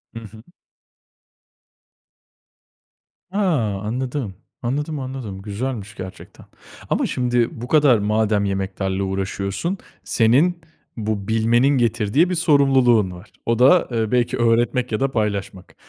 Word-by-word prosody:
I 115 - -5
hı. 110 0 -13 2.9
A! 200 - -4 0.4
Anladım, 120 -1 -3 0.3
anladım, 145 +5 -2
anladım, 130 -7 -6
güzelmiş 110 +1 -5
gerçekten. 95 0 -10 0.4
Ama - - +1
şimdi 120 -2 0
bu 120 - -5
kadar 145 -4 +5
madem 105 0 +1
yemeklerle 95 0 -2
uğraşıyorsun, 95 - -3 0.3
senin 145 +10 +2 0.4
bu 105 -2 -3
bilmenin 115 +3 +3
getirdiği 120 - +2
bir 180 - -1
sorumluluğun 135 - +3
var. 90 +4 -12
O 115 0 0
da, 140 +8 +5
eee, 115 -2 -1
belki 125 -1 +1
öğretmek 120 +2 +1
ya 110 - -1
da 135 0 0
paylaşmak. 100 -4 -3
115 Hz, 115 wpm, -21 LUFS, 105-130 Hz, 2.9 s, kadar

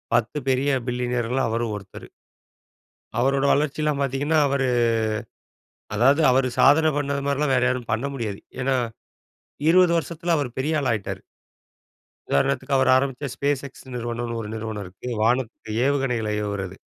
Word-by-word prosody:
10 120 +5 0
பெரிய 130 +2 +2 0.2
பில்லியனர்கள்ல 125 +1 -1
அவரும் 115 -1 -1
ஒருத்தரு. 95 -1 -11 1.1
அவரோட 135 +2 +2
வளர்ச்சில்லாம் 150 0 0
பாத்தீங்கன்னா, 140 +4 +1
அவரு 135 -1 +1 1.3
அதாவது 135 +8 +4
அவரு 130 0 +3
சாதனை 155 +2 +6
பண்ணது 140 -1 -1
மாரிலாம் 140 0 +1
வேற 125 - +2
யாரும் 125 -2 -2
பண்ண 115 +5 0
முடியாது. 110 -6 -4 0.2
ஏன்னா 130 +1 +1 0.9
20 180 0 +6
வருஷத்துல 170 +1 -2
அவரு 140 -4 -1
பெரிய 155 +4 0
ஆளா 130 -4 0
ஆயிட்டாரு. 105 -3 -4 1.1
உதாரணத்துக்கு 135 - +1
அவர் 130 -1 +4
ஆரம்பிச்ச 135 +1 -1
SpaceX 140 -1 -1 0.2
நிறுவனம்னு 120 0 -3
ஒரு 105 - -6
நிறுவனம் 110 -1 -4
இருக்கு. 95 +6 -9
வானத்துக்கு 115 -1 0
ஏவுகணைகளை 125 -6 0
ஏவுறது. 95 -2 -4
130 Hz, 130 wpm, -24 LUFS, 115-140 Hz, 1.3 s, சாதனை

